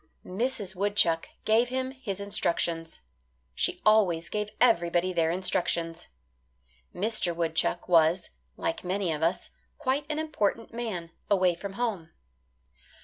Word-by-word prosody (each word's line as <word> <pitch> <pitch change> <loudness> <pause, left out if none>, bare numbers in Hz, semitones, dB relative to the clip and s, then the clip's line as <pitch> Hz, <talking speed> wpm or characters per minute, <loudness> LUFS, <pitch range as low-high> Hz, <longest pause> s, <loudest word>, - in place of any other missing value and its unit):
Mrs. 205 -1 -2
Woodchuck 180 -4 +2 0.2
gave 230 +3 +3
him 260 +1 -2
his 250 -8 -5
instructions. 170 -4 -1 0.5
She - - 0
always 195 -6 +4
gave 210 -1 -2
everybody 175 -6 +3
their 165 -2 +2
instructions. 170 -2 -1 0.8
Mr. 195 -3 0
Woodchuck 165 +1 0
was, 170 +1 +3 0.3
like 330 0 -2
many 185 -1 -1
of 155 -1 -3
us, 165 +2 0 0.3
quite 275 +2 -1
an 305 - -1
important 230 -8 -1
man, 205 -8 -4 0.2
away 185 -3 +4
from 195 +3 -7
home. 200 -7 -2
190 Hz, 120 wpm, -28 LUFS, 170-225 Hz, 0.8 s, always